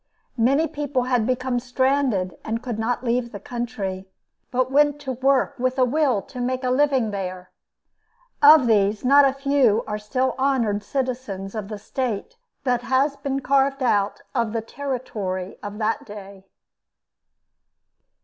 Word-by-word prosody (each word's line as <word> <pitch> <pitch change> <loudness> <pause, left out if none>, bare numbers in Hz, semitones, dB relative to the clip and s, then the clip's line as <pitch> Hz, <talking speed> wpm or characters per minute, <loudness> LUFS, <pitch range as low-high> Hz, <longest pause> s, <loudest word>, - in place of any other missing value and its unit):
Many 275 +8 +3
people 285 -4 -2
had 245 -3 +1
become 255 -1 0
stranded 255 -6 0
and 230 +1 -3
could 235 -4 -4
not 240 +3 -1
leave 240 0 0
the 205 - -7
country, 200 -5 -5 0.4
but 255 +1 0
went 290 +1 +3
to 270 -2 -4
work 265 +2 +2
with 255 +1 0
a 255 - +4
will 260 -5 +1
to 250 - -8
make 255 +1 -2
a 250 - +1
living 265 -4 +2
there. 185 -2 -5 0.9
Of 295 -2 +8
these 210 -1 +2
not 280 +2 +7
a 270 - +2
few 275 -5 +2
are 210 0 -4
still 255 +5 -1
honored 240 -7 +1
citizens 240 -6 -4
of 215 -3 -4
the 210 0 -6
state 250 - -4 0.3
that 245 -2 +1
has 265 +3 +1
been 275 -1 -3
carved 275 0 +2
out 205 -4 +1
of 225 -2 0
the 225 - -1
territory 220 -8 -4
of 205 0 -7
that 220 0 -1
day. 200 -2 -11
250 Hz, 150 wpm, -23 LUFS, 210-270 Hz, 0.9 s, Of